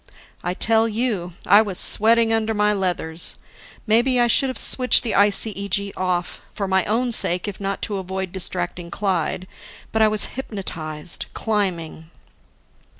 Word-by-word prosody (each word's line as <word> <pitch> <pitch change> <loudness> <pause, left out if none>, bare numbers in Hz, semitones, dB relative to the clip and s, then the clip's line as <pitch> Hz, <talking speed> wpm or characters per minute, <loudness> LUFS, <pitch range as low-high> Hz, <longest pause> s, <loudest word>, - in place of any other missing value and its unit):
I 180 +1 -3
tell 225 +2 +2
you. 210 -6 -2
I 205 +3 +6
was 200 -4 -3
sweating 225 +1 +5
under 225 0 0
my 210 0 +2
leathers. 175 -4 0 0.5
Maybe 240 +3 +3
I 240 - +4
should 260 +3 +2
have 260 - -5
switched 255 -1 +3
the 230 - -2
ICEG 200 -1 0
off, 180 -2 -2
for 200 - -3
my 190 -1 +2
own 240 +3 0
sake 180 -4 +3
if 205 -1 -7
not 195 0 -4
to 205 -3 -2
avoid 190 -1 -5
distracting 175 -1 -3
Clyde. 185 -2 -2 0.5
But 220 - 0
I 220 - +6
was 215 0 +1
hypnotized, 170 -10 -6
climbing. 175 -7 -3
200 Hz, 150 wpm, -21 LUFS, 180-220 Hz, 0.5 s, I